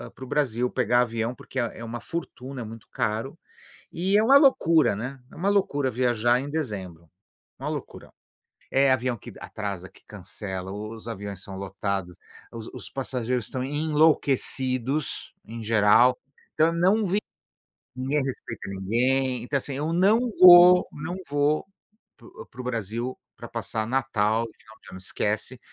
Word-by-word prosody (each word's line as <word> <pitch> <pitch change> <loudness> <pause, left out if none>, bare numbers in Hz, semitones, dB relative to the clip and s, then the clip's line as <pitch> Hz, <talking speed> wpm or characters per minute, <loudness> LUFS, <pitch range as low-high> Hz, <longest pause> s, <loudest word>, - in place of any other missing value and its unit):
para - - -10
o - - -12
Brasil 125 -4 0
pegar 120 -1 +2
avião, 115 0 -1
porque 130 - -6
é 115 -1 -3
uma 115 +1 -5
fortuna, 135 -5 -6
é - - -4
muito 110 0 -10
caro. 115 +8 -2 0.6
E 190 +4 +1
é - - +4
uma 275 +4 +8
loucura, 165 - +4
né. 130 +4 -6
É - - -13
uma 195 +4 0
loucura 145 -9 +1
viajar 120 0 +2
em 140 - -6
dezembro, 95 - -5 0.5
uma - - -3
loucura. - - -7 0.6
É 135 0 +4
avião 125 -1 0
que - - -11
atrasa, 100 -3 -6
que - - -21
cancela, 95 -2 -7
o 105 +2 -6
os 110 - -11
aviões 100 -3 -6
são 95 - -8
lotados, 95 -2 -4 0.4
os 115 -1 -8
os - - -7
passageiros 125 -2 -2
estão 130 -1 -4
enlouquecidos 145 -2 +1
em 115 0 -8
geral, 115 +3 +4 0.4
então 160 - +4
eu - - 0
não 190 +6 +3
vi 195 +3 +1 0.8
ninguém 135 +2 -1
respeita 115 -6 -6
ninguém, 125 +6 0
então 140 +3 -1
assim, 135 0 -4
não 195 +6 +4 0.2
vou, 180 0 +9
não 160 +4 -5
vou 145 +1 +1 0.5
para 115 - -16
o - - -12
para 125 - -9
o - - -9
Brasil 115 +1 -3 0.2
para - - -8
passar 110 0 -3
Natal, 115 -3 +1
final 110 0 -18
de - - -14
ano 95 - -8
esquece, 105 +5 -2
125 Hz, 160 wpm, -25 LUFS, 110-145 Hz, 0.8 s, vou